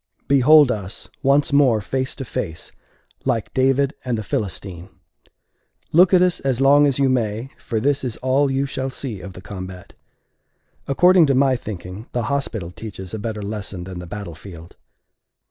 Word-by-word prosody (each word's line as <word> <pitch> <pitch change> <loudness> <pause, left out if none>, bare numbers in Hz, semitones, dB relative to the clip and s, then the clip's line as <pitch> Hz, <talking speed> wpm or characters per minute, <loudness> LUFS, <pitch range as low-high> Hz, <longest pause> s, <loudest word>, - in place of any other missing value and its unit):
Behold 140 +1 +6
us 100 -3 -6
once 140 +1 +2
more 135 -6 +4
face 130 +5 -3
to 135 - -6
face, 85 -7 -5 0.5
like 120 -5 -1
David 135 +2 +2
and 125 -3 -1
the 110 - -4
Philistine. 95 -2 -4 1.0
Look 180 +3 +6
at 180 -1 +6
us 180 -1 +1
as 130 -3 -1
long 145 +2 +6
as 135 - 0
you 140 -1 +3
may; 120 0 -1
for 115 - -3
this 140 +4 +1
is 120 -4 -3
all 135 +2 +1
you 135 +1 0
shall 135 -1 -3
see 125 -7 -6
of 90 +2 -9
the 95 - -11
combat. 95 -2 -9 0.9
According 180 +4 +5
to 135 - +2
my 135 0 +3
thinking, 100 -2 -7
the 120 - -1
hospital 110 -11 -3
teaches 95 -2 -9
a 110 - -4
better 110 -1 -4
lesson 100 -3 -5
than 90 -1 -7
the 90 - -8
battle 100 -2 -6
field. 85 -1 -12
120 Hz, 170 wpm, -21 LUFS, 100-135 Hz, 1.0 s, Behold